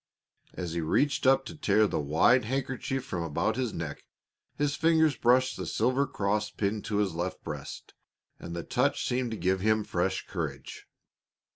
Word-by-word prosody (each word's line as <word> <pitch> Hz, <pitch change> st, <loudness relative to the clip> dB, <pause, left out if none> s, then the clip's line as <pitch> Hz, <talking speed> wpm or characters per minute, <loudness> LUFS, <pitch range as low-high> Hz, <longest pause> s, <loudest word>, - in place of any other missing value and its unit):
As 90 Hz, -3 st, -4 dB
he 85 Hz, -, -1 dB
reached 140 Hz, -, +1 dB
up 135 Hz, 0 st, +4 dB
to 165 Hz, -, -8 dB
tear 110 Hz, -7 st, +3 dB
the -, -, -1 dB
wide 80 Hz, -, +3 dB
handkerchief 130 Hz, +1 st, -2 dB
from 90 Hz, -10 st, -3 dB
about 85 Hz, +7 st, -1 dB
his 125 Hz, -2 st, -1 dB
neck 80 Hz, -6 st, -6 dB, 0.5 s
his 145 Hz, 0 st, 0 dB
fingers 160 Hz, -2 st, +3 dB
brushed 130 Hz, +2 st, +3 dB
the -, -, -5 dB
silver 135 Hz, +2 st, +1 dB
cross 105 Hz, +1 st, -1 dB
pinned 105 Hz, +1 st, -2 dB
to 110 Hz, -, -2 dB
his 100 Hz, -4 st, +1 dB
left 85 Hz, +2 st, -4 dB
breast, -, -, -7 dB, 0.5 s
and 85 Hz, -, -7 dB
the 85 Hz, -, -4 dB
touch -, -, 0 dB
seemed 125 Hz, 0 st, 0 dB
to 110 Hz, -, -4 dB
give 95 Hz, 0 st, +1 dB
him 110 Hz, +2 st, +2 dB
fresh -, -, -1 dB
courage. -, -, -6 dB
110 Hz, 170 wpm, -29 LUFS, 95-130 Hz, 0.5 s, up